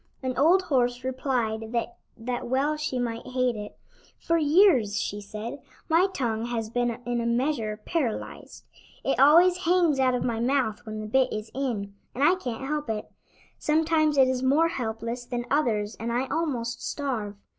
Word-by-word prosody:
An 255 -1 -2
old 340 +8 +4
horse 245 -6 0
replied 240 -4 -2 0.4
that 245 +1 -4
well 275 +5 +1
she 300 -4 -3
might 235 -2 -2
hate 255 -1 0
it. 210 -1 -8 0.4
"For 335 0 +1
years," 295 - +4
she 205 +1 -3
said, 215 +7 -7 0.3
"my 335 +4 +4
tongue 230 -8 -2
has 225 -2 -3
been 240 -1 -1
in 240 -1 -1
a 235 - -1
measure 235 -3 0
paralyzed. 285 -11 -3 0.4
It 270 - 0
always 340 +6 +6
hangs 340 -5 +3
out 255 -1 +3
of 245 - -1
my 230 -2 -1
mouth 240 -2 0
when 215 0 -5
the - - -5
bit 260 +4 +2
is 215 +1 -5
in, 230 -7 -3 0.2
and 265 - 0
I 325 +5 +6
can't 265 -8 -4
help 295 -3 -2
it. 215 -1 -4 0.5
Sometimes 310 -1 +2
it 265 -1 +6
is 255 -1 -1
more 290 +6 +3
helpless 230 -3 -4
than 240 -1 -4
others 225 -7 +1
and 230 +1 -3
I 245 +3 0
almost 250 -7 -2
starve. 235 -8 -3
250 Hz, 170 wpm, -26 LUFS, 230-290 Hz, 0.5 s, always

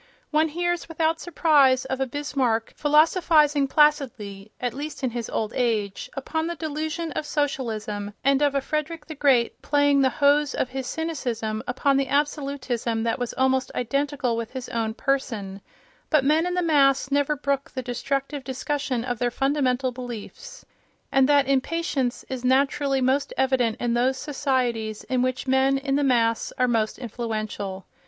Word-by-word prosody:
One 310 +1 +3
hears 350 +2 -2
without 325 0 0
surprise 290 -7 +3
of 265 0 -3
a 265 - +1
Bismarck 260 -5 -1
philosophizing 300 -1 +4
placidly 240 -10 +1
(at 245 -2 -2
least 290 +1 -6
in 255 - 0
his 235 -1 -4
old 215 -1 -2
age) 215 -5 -1
upon 320 +4 -2
the 340 - -3
delusion 315 +1 -3
of - - -3
Socialism 220 -8 -3
and 275 +1 +3
of 285 -1 +2
a 275 - +2
Frederick 305 +2 -3
the 315 - -7
Great 270 -5 +2
playing 285 -1 +3
the 265 - +4
hose 285 0 +2
of 255 - -1
his 265 -1 -5
cynicism 245 -9 -3
upon 270 +2 +1
the 275 -1 +1
absolutism 275 -5 -1
that 230 +2 -1
was 245 -1 -2
almost 260 0 +1
identical 275 0 -1
with 230 +1 -5
his 260 -2 -6
own 220 -1 -2
person, 220 -9 -2 0.5
but 300 -4 +3
men 315 +4 +3
in 360 - -2
the 360 - +1
mass 275 -4 +3
never 285 +1 +2
brook 280 -1 -2
the 260 - -5
destructive 275 +3 -3
discussion 265 -2 -2
of 245 -3 -3
their 245 - +1
fundamental 265 0 0
beliefs, 250 - -9 0.5
and 270 0 +4
that 285 -2 +4
impatience 275 -2 -1
is 260 -2 -5
naturally 275 +1 +2
most 265 +2 +1
evident 255 -4 +1
in 240 -1 0
those 255 +2 +1
societies 255 -7 -1
in 255 -2 0
which 255 0 -1
men 265 +1 +3
in 275 0 -1
the 290 - +2
mass 230 -4 +2
are 250 - +3
most 225 -3 0
influential. 215 -5 -4
270 Hz, 160 wpm, -24 LUFS, 245-290 Hz, 0.5 s, philosophizing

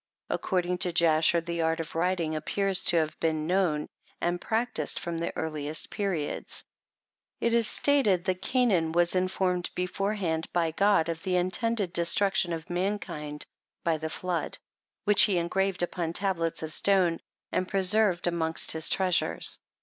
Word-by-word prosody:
According 180 -1 -1
to 180 - +2
Jasher, 165 0 +3
the 170 0 -3
art 160 0 0
of 165 - -5
writing 170 -2 -1
appears 195 +5 0
to 170 - +4
have 155 -1 -1
been 155 -2 -1
known 175 -4 0 0.3
and 175 0 -1
practised 225 -9 0
from 170 -1 -4
the 170 - -2
earliest 155 -1 -2
periods; 190 -8 -3 0.8
it 235 - 0
is 230 -2 +5
stated 215 -11 +2
that 185 -1 -1
Cainanwas 175 -9 +1
informed 185 -1 0
beforehand 180 -3 -2
by 170 -2 0
God, 200 -1 +2
of 165 -1 -4
the 185 +1 -1
intended 190 +2 +1
destruction 180 +2 +3
of 165 0 -5
mankind 175 -5 -2 0.4
by 165 -2 +1
the 160 +1 -5
flood, 180 +1 -2 0.5
which 205 -1 +4
he 195 -4 +4
engraved 185 +2 0
upon 170 -2 -3
tablets 170 -5 0
of 160 0 -3
stone, 185 -4 +2 0.3
and 185 - -1
preserved 195 -1 +3
amongst 165 -2 +1
his 160 0 +2
treasures. 185 -2 0
175 Hz, 145 wpm, -27 LUFS, 165-195 Hz, 0.8 s, is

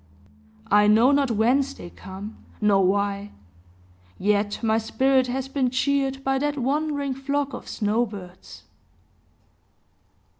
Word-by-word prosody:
I 210 0 +5
know 225 +5 +5
not 280 -2 +2
whence 255 +5 +1
they 175 - -10
come, 195 +3 -10 0.2
nor 200 -2 +3
why; 200 +1 0 0.8
yet 205 +2 0
my 220 0 +2
spirit 260 +3 +2
has 260 +1 -3
been 270 -2 0
cheered 270 +1 0
by 270 0 +1
that 290 +1 -1
wandering 285 +1 -1
flock 280 +1 -2
of - - -8
snow 220 +3 0
birds. 185 -3 -11
245 Hz, 120 wpm, -24 LUFS, 205-275 Hz, 0.8 s, I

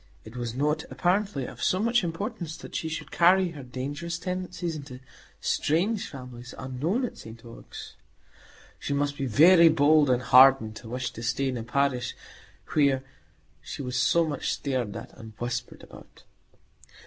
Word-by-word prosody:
(It 110 +2 -11
was 120 -1 -4
not, 150 +3 0
apparently, 190 -5 0
of - - -10
so 185 - +2
much 230 +1 +2
importance 170 -1 -4
that - - -11
she 160 - -2
should 160 - -6
carry 180 +2 +4
her 150 -4 -9
dangerous 140 +6 -5
tendencies 180 -2 -4
into 140 -4 -9 0.4
strange 195 +8 0
families 125 -2 -10
unknown 155 - -1
at - - -8
St 115 +1 -12
Ogg's.) 115 - -10 0.9
She 140 - -3
must 145 0 0
be 135 -2 -3
very 165 - +7
bold 150 -1 +4
and 125 0 +2
hardened 130 -4 +6
to 115 - -10
wish 125 +1 -3
to 115 - -9
stay 135 +3 0
in 125 - -3
a - - -4
parish 125 +1 -1 0.6
where 140 -3 +3 0.6
she 85 - -7
was 125 -1 -4
so 165 +7 +3
much 145 -3 -2
stared 125 -7 -2
at 115 - -8
and 110 -3 -11
whispered 120 0 -4
about. - - -15
140 Hz, 160 wpm, -27 LUFS, 125-170 Hz, 0.9 s, very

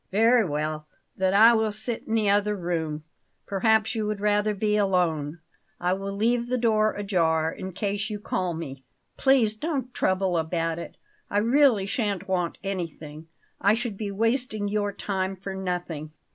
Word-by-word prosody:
"Very 225 +4 +5
well; 155 -2 -3 0.3
then 190 0 +1
I 225 +3 +8
will 220 -1 +1
sit 220 +3 -3
in 225 - 0
the 215 -2 +2
other 205 +1 +2
room; 165 -4 -3 0.4
perhaps 220 +2 +2
you 220 -2 -2
would 210 -1 -2
rather 210 0 +1
be 210 +1 +1
alone. 175 -6 0 0.4
I 180 +1 +1
will 195 +1 -4
leave 235 +4 +1
the 255 +1 0
door 215 -2 +2
ajar, 165 -6 +1
in 190 +2 -7
case 205 +2 -2
you 210 -1 -4
call 185 -4 -2
me." 135 -5 -7 0.3
"Please 255 -6 +3
don't 265 -1 -3
trouble 185 -2 +1
about 165 0 -1
it; - - -9 0.3
I 205 - -1
really 235 -1 +4
shan't 200 -3 -2
want 180 -3 -1
anything. 165 -5 -5 0.3
I 205 +2 +4
should 235 -2 -3
be 205 0 -4
wasting 225 0 0
your 205 0 0
time 195 -1 -2
for 195 +1 -6
nothing." 175 -5 -4
200 Hz, 165 wpm, -26 LUFS, 175-220 Hz, 0.4 s, I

